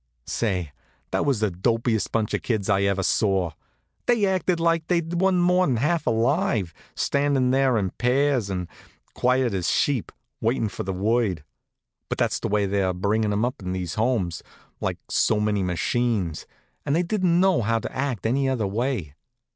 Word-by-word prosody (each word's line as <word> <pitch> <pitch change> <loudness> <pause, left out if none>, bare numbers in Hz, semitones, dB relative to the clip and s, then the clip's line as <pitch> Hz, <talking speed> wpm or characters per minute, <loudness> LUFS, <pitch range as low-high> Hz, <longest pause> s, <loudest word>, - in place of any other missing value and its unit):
Say, 90 -9 -2 0.4
that - - 0
was 130 -6 +1
the 105 -3 +1
dopiest 115 +3 0
bunch 110 -2 0
of - - 0
kids 105 -4 -1
I 100 -1 +3
ever 100 -1 +1
saw. 95 -3 +1 0.6
They 235 -4 +3
acted 185 -2 +1
like 165 -1 +1
they 175 -1 +3
wa'n't 175 +2 +1
more'n 180 -6 +3
half 150 +7 0
alive, 115 - +1 0.2
standin' 140 -3 +1
there 135 -2 +3
in 95 -3 -1
pairs, 125 -3 +1
as 90 -2 -2 0.5
quiet 125 -2 +1
as 90 -3 -1
sheep, 135 -6 +1 0.3
waitin' 115 -1 0
for - - -6
the 95 - -3
word. 100 -3 0 0.7
But - - -2
that's - - 0
the - - -2
way 105 0 +1
they 95 -1 +1
bring 100 +5 0
'em 105 +1 +1
up 125 -1 -4
in 90 -1 -3
these 90 -2 -3
Homes, 110 -7 0 0.4
like - - -2
so 105 - +2
many 105 -1 +1
machines, 95 -1 -1 0.4
and 140 - 0
they 175 - +2
didn't 180 -2 +1
know 190 -6 +3
how 115 +1 +1
to 115 - -5
act 130 -7 -2
any 135 +4 +1
other 125 -5 0
way. 105 - -2
115 Hz, 170 wpm, -24 LUFS, 100-140 Hz, 0.7 s, I